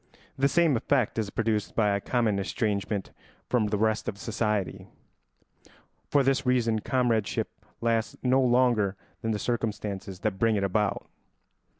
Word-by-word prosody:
The 135 - +3
same 165 -1 +3
effect 125 -1 +1
is 105 -2 -1
produced 110 -2 -1
by 105 -2 +3
a 100 - -2
common 110 -4 +1
estrangement 100 0 -2 0.4
from 120 -4 +2
the 105 0 0
rest 110 +1 +1
of 100 - -6
society. 105 -3 -2 1.2
For 140 -1 +4
this 135 +1 +2
reason 120 -4 +2
comradeship 115 -3 0 0.3
lasts 115 -1 0
no 130 +1 +4
longer 120 -6 +3 0.3
than 115 - -2
the 110 - 0
circumstances 105 -5 -3
that 105 -3 -1
bring 115 -1 +3
it 100 - 0
about. 100 +1 0
110 Hz, 140 wpm, -27 LUFS, 105-125 Hz, 1.2 s, For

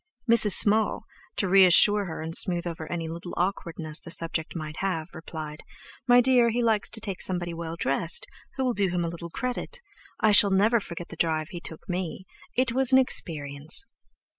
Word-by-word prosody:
Mrs. 220 -4 +7
Small, 215 +3 +6 0.3
to 195 - -2
reassure 195 +2 +5
her 165 -3 -7
and 160 +1 -5
smooth 175 -1 +2
over 160 -2 -7
any 165 -2 -4
little 170 +2 -8
awkwardness 170 -4 -3
the - - -12
subject 165 0 -2
might 155 -2 -7
have, 175 -5 -3
replied: 155 -2 -9 0.5
"My 245 0 +6
dear, 245 -2 +3
he 240 +1 -2
likes 220 -3 0
to 225 - -6
take 195 -4 -6
somebody 175 -2 -2
well 165 0 -6
dressed, 165 - -1 0.3
who 265 - -3
will 250 - 0
do 200 -4 0
him 175 -1 -2
a - - -3
little 170 0 -9
credit. 250 - -5 0.4
I 215 - +3
shall 205 0 +6
never 210 +5 +2
forget 175 -3 -9
the - - -10
drive 160 -1 -2
he 175 - -8
took 160 - -7
me. 185 0 -5 0.3
It 255 -1 +1
was 260 +1 +1
an 260 - +6
experience!" 155 - -1
175 Hz, 190 wpm, -25 LUFS, 165-215 Hz, 0.5 s, Mrs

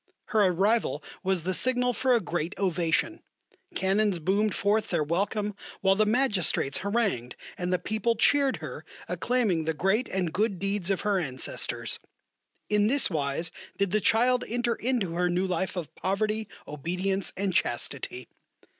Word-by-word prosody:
Her 215 -3 +4
arrival 200 +6 +1 0.2
was 190 -3 0
the 185 +2 -1
signal 250 +3 +3
for 255 +2 +2
a - - +3
great 175 -2 -3
ovation. 180 - 0 0.5
Cannons 195 0 +2
boomed 200 +6 +1
forth 210 +2 +1
their 170 -4 +1
welcome, 205 +6 -1 0.3
while 190 0 +4
the 210 +2 +2
Magistrates 210 - +2
harangued, 200 - -1 0.2
and 180 0 -3
the 180 - +3
people 220 +5 -1
cheered 275 +4 +3
her, - - -7 0.2
acclaiming 220 -10 0
the 160 0 -1
great 195 - +1
and 180 -4 -1
good 205 0 0
deeds 195 -1 -2
of 195 - 0
her 205 -2 +1
ancestors. 130 -6 -2 0.7
In 210 0 +3
this 270 -3 +3
wise 155 +2 -1 0.3
did 200 -2 0
the 215 +1 +2
child 245 +4 +3
enter 240 +1 0
into 230 -6 -1
her 180 +1 +1
new 180 +2 +1
life 185 +1 -2
of 175 -4 -5
poverty, 215 +3 -1 0.2
obedience, 180 +6 -2
and 195 -1 -1
chastity. 125 -2 -2
195 Hz, 155 wpm, -27 LUFS, 175-220 Hz, 0.7 s, Her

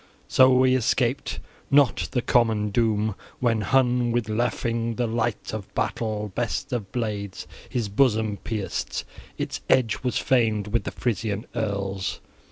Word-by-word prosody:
So 130 0 +6
he 130 0 +4
escaped 130 +1 0 0.3
not 140 -3 +4
the 125 -2 -1
common 110 -3 +2
doom, 110 -1 +1 0.3
when 115 -3 +2
Hun 125 +2 +2
with 115 -2 0
"Lafing," 115 +1 -1
the 125 - 0
light 115 -1 -2
of 110 -3 -6
battle, 105 -2 -2
best 125 +5 -2
of 105 -5 -3
blades, 105 -5 -3 0.2
his 120 -4 -1
bosom 110 -1 +2
pierced: 105 -3 -3 0.3
its - - -3
edge 115 -5 +3
was 125 -1 -1
famed 110 -5 +2
with 115 +2 0
the - - -3
Frisian 110 -3 -2
earls. 100 -4 -2
115 Hz, 140 wpm, -25 LUFS, 105-125 Hz, 0.3 s, So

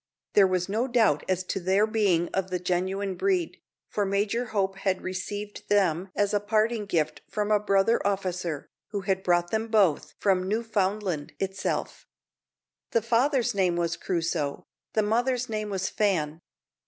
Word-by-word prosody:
There 200 -2 +6
was 185 -1 0
no 220 +6 0
doubt 225 - +3
as 185 0 +1
to 190 - -3
their 190 +3 +3
being 200 -6 +1
of 190 -1 -2
the 180 - -1
genuine 185 +2 -1
breed, 365 - 0 0.3
for 210 - -1
Major 205 +5 0
Hope 195 -4 -1
had 190 -1 -1
received 205 +3 -5
them 190 -3 +2
as 205 0 +1
a 205 - +3
parting 215 +1 0
gift 160 -5 0
from 210 0 -1
a 210 - +5
brother 200 +2 +2
officer, 180 -6 -2 0.2
who 205 -2 -3
had 190 -1 0
brought 175 -1 +1
them 220 +1 0
both 205 -8 +2
from 185 -2 +2
Newfoundland 205 -6 -1
itself. 190 0 -3 0.8
The 230 - +1
father's 245 +3 +2
name 185 -3 +2
was 170 -1 0
Crusoe, 165 -2 -2 0.3
the 215 - +2
mother's 245 +3 +1
name 215 -1 -2
was 190 -1 -1
Fan. 165 -7 0
195 Hz, 155 wpm, -27 LUFS, 185-215 Hz, 0.8 s, There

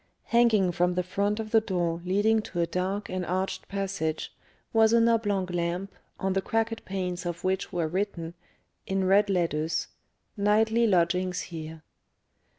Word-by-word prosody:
Hanging 225 -6 +3
from 175 +1 +1
the 180 - +1
front 200 +4 -1
of 215 -1 -5
the 225 - +5
door 175 -4 -1
leading 205 +4 +2
to 180 -4 -6
a 170 - +3
dark 190 +4 -2
and 185 0 -3
arched 185 +3 -2
passage, 195 -6 -3 0.4
was 225 0 +5
an 230 0 +5
oblong 205 -5 +1
lamp, 180 +2 -3 0.3
on 190 0 0
the 195 - +1
cracked 225 +2 -1
panes 185 -2 -3
of 175 -1 -4
which 190 0 -1
were 170 -4 0
written, 170 -2 -3 0.5
in 190 0 0
red 200 +2 +4
letters, 165 -4 0 0.5
"Nightly 220 +3 +3
Lodgings 180 -1 +1
Here." 160 -2 -8
190 Hz, 155 wpm, -27 LUFS, 175-210 Hz, 0.5 s, the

